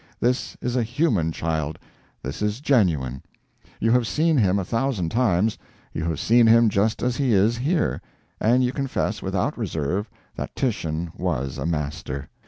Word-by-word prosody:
This 125 Hz, +1 st, 0 dB
is 125 Hz, 0 st, -2 dB
a 125 Hz, -, +2 dB
human 115 Hz, -, +1 dB
child, 80 Hz, -2 st, -2 dB, 0.5 s
this 70 Hz, +8 st, -5 dB
is 105 Hz, +2 st, 0 dB
genuine. 80 Hz, -, +1 dB, 0.6 s
You 115 Hz, -, +2 dB
have 120 Hz, -1 st, +3 dB
seen 160 Hz, +5 st, +2 dB
him 100 Hz, -7 st, +3 dB
a 95 Hz, -, -1 dB
thousand 115 Hz, -6 st, -1 dB
times 110 Hz, -2 st, +1 dB, 0.3 s
you 80 Hz, -, -3 dB
have 80 Hz, -3 st, -2 dB
seen 115 Hz, 0 st, +5 dB
him 115 Hz, 0 st, +6 dB
just 105 Hz, +2 st, 0 dB
as 125 Hz, -1 st, 0 dB
he 135 Hz, -5 st, +2 dB
is 105 Hz, +4 st, +4 dB
here 150 Hz, +7 st, 0 dB, 0.4 s
and 125 Hz, +4 st, +3 dB
you 125 Hz, -, +1 dB
confess, 130 Hz, -6 st, -2 dB
without 100 Hz, +9 st, -1 dB
reserve, 95 Hz, +1 st, -2 dB, 0.3 s
that -, -, -5 dB
Titian 85 Hz, -, -2 dB
WAS 65 Hz, +1 st, -2 dB
a 70 Hz, -, -2 dB
Master. 75 Hz, -3 st, -3 dB
105 Hz, 165 wpm, -24 LUFS, 80-125 Hz, 0.6 s, him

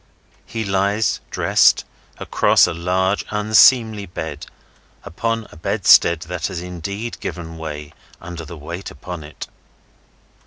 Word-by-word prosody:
He 110 Hz, -1 st, -4 dB
lies, 100 Hz, +3 st, +1 dB
dressed, -, -, +3 dB, 0.3 s
across -, -, +3 dB
a -, -, -2 dB
large 95 Hz, +3 st, 0 dB
unseemly 110 Hz, 0 st, +4 dB
bed, 80 Hz, -3 st, -6 dB, 0.6 s
upon 115 Hz, +5 st, -2 dB
a -, -, -14 dB
bedstead 80 Hz, +1 st, +4 dB
that 90 Hz, -1 st, -4 dB
has 95 Hz, -3 st, -5 dB
indeed 90 Hz, +6 st, -6 dB
given 80 Hz, -1 st, -6 dB
way 75 Hz, -2 st, -7 dB, 0.3 s
under 85 Hz, -1 st, -8 dB
the 85 Hz, +1 st, -9 dB
weight 85 Hz, +5 st, -7 dB
upon 85 Hz, +3 st, -8 dB
it. 75 Hz, 0 st, -9 dB
90 Hz, 120 wpm, -20 LUFS, 80-100 Hz, 0.6 s, unseemly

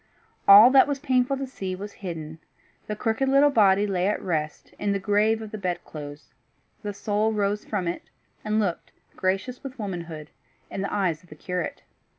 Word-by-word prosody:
All 210 Hz, +5 st, +10 dB
that 270 Hz, +1 st, +6 dB
was 285 Hz, -1 st, -1 dB
painful 265 Hz, -1 st, +1 dB
to 270 Hz, -, -3 dB
see 190 Hz, -8 st, -5 dB
was 200 Hz, +2 st, -7 dB
hidden; 160 Hz, -4 st, -6 dB, 0.5 s
the 210 Hz, -, -3 dB
crooked 225 Hz, +5 st, 0 dB
little 280 Hz, +2 st, +5 dB
body 205 Hz, -5 st, +4 dB
lay 190 Hz, -2 st, 0 dB
at 210 Hz, -, 0 dB
rest 155 Hz, -4 st, -3 dB
in 205 Hz, -1 st, 0 dB
the 200 Hz, -, -1 dB
grave 215 Hz, +3 st, +2 dB
of 215 Hz, -, -9 dB
the 215 Hz, -, -6 dB
bed 180 Hz, -2 st, -3 dB
clothes; 145 Hz, -1 st, -10 dB, 0.5 s
the 210 Hz, -, -4 dB
soul 210 Hz, +2 st, 0 dB
rose 205 Hz, 0 st, 0 dB
from 195 Hz, -5 st, -2 dB
it, 170 Hz, -, -3 dB, 0.4 s
and 215 Hz, 0 st, 0 dB
looked, 190 Hz, -5 st, -2 dB, 0.2 s
gracious 195 Hz, +7 st, -2 dB
with 270 Hz, -2 st, -8 dB
womanhood, 170 Hz, -7 st, -6 dB, 0.4 s
in 195 Hz, -, -4 dB
the 200 Hz, -, -3 dB
eyes 175 Hz, -6 st, 0 dB
of 180 Hz, -, -23 dB
the 150 Hz, -, -11 dB
curate. 180 Hz, +2 st, -4 dB
200 Hz, 185 wpm, -25 LUFS, 180-220 Hz, 0.5 s, All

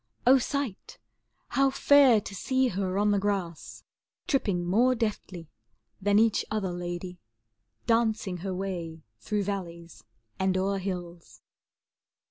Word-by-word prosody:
O 260 Hz, +2 st, +7 dB
sight! 265 Hz, -5 st, -4 dB, 0.5 s
how 275 Hz, 0 st, +3 dB
fair, 270 Hz, -3 st, +5 dB
to 205 Hz, -, -9 dB
see 260 Hz, +6 st, 0 dB
her 190 Hz, -1 st, -2 dB
on 205 Hz, +1 st, +2 dB
the 200 Hz, -, +2 dB
grass 190 Hz, -5 st, -3 dB, 0.4 s
Tripping 200 Hz, -11 st, 0 dB
more 240 Hz, +8 st, +3 dB
deftly 200 Hz, -7 st, -4 dB, 0.5 s
than 205 Hz, +1 st, +3 dB
each 225 Hz, 0 st, +3 dB
other 210 Hz, -4 st, -2 dB
lady, 175 Hz, 0 st, -6 dB, 0.7 s
Dancing 220 Hz, -5 st, +1 dB
her 185 Hz, +1 st, -4 dB
way 170 Hz, -4 st, -5 dB, 0.2 s
through 205 Hz, -, -2 dB
valleys 170 Hz, -, -6 dB, 0.4 s
and 190 Hz, 0 st, +1 dB
o'er 195 Hz, +1 st, 0 dB
hills. 175 Hz, -3 st, -7 dB
195 Hz, 120 wpm, -28 LUFS, 180-220 Hz, 0.7 s, O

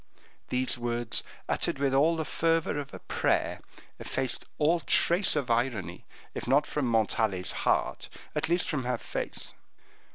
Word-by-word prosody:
These 125 Hz, 0 st, +2 dB
words, 120 Hz, -1 st, +1 dB, 0.3 s
uttered -, -, 0 dB
with 135 Hz, -1 st, 0 dB
all 155 Hz, +5 st, +4 dB
the 160 Hz, -1 st, -2 dB
fervor 165 Hz, -2 st, 0 dB
of 140 Hz, -, -7 dB
a -, -, -8 dB
prayer, -, -, -1 dB, 0.4 s
effaced 130 Hz, -2 st, -1 dB
all 160 Hz, +3 st, +3 dB
trace 170 Hz, +3 st, +4 dB
of 135 Hz, -5 st, -1 dB
irony, 115 Hz, -5 st, -1 dB, 0.3 s
if -, -, -6 dB
not 140 Hz, +4 st, +4 dB
from 150 Hz, -3 st, -2 dB
Montalais's 110 Hz, -4 st, +1 dB
heart, -, -, -1 dB, 0.3 s
at 155 Hz, +1 st, 0 dB
least 175 Hz, +2 st, +1 dB
from 150 Hz, -8 st, -2 dB
her 125 Hz, -1 st, 0 dB
face. -, -, -4 dB
135 Hz, 150 wpm, -28 LUFS, 120-155 Hz, 0.4 s, all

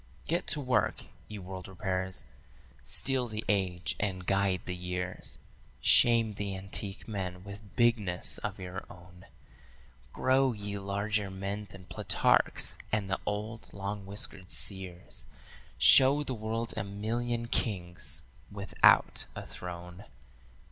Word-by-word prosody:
"Get 170 Hz, +3 st, 0 dB
to 150 Hz, -, +3 dB
work, 130 Hz, -3 st, +1 dB, 0.2 s
ye 105 Hz, -, -7 dB
world 95 Hz, -1 st, -7 dB
repairers. 95 Hz, -1 st, -3 dB, 0.6 s
Steel 130 Hz, -2 st, +4 dB
the 110 Hz, -1 st, -4 dB
age 95 Hz, -4 st, 0 dB
and 95 Hz, -3 st, -2 dB
guide 95 Hz, -1 st, +2 dB
the 90 Hz, -, -3 dB
years, 90 Hz, 0 st, -4 dB, 0.4 s
Shame 115 Hz, -2 st, +6 dB
the 100 Hz, -1 st, -4 dB
antique 95 Hz, +1 st, -5 dB
men 90 Hz, -4 st, -4 dB
with 100 Hz, +1 st, -11 dB
bigness 110 Hz, -7 st, +1 dB
of -, -, -4 dB
your 90 Hz, 0 st, -6 dB
own; 90 Hz, 0 st, -14 dB, 0.8 s
Grow 130 Hz, 0 st, +3 dB
ye 100 Hz, -1 st, -5 dB
larger 100 Hz, +1 st, -1 dB
men 100 Hz, +2 st, -4 dB
than 95 Hz, -1 st, -12 dB
Plutarch's -, -, +2 dB
and 100 Hz, -3 st, 0 dB
the 95 Hz, -, 0 dB
old 105 Hz, +2 st, -4 dB
long 100 Hz, 0 st, -5 dB
whiskered 100 Hz, -2 st, -3 dB
seers; 95 Hz, -3 st, 0 dB, 0.5 s
Show 140 Hz, +3 st, +7 dB
the 135 Hz, -, -3 dB
world 115 Hz, +1 st, -3 dB
a -, -, -1 dB
million 115 Hz, +4 st, -2 dB
kings 90 Hz, -7 st, -1 dB, 0.3 s
without 100 Hz, -1 st, +4 dB
a -, -, -6 dB
throne. 90 Hz, +1 st, -8 dB
100 Hz, 125 wpm, -31 LUFS, 95-110 Hz, 0.8 s, Show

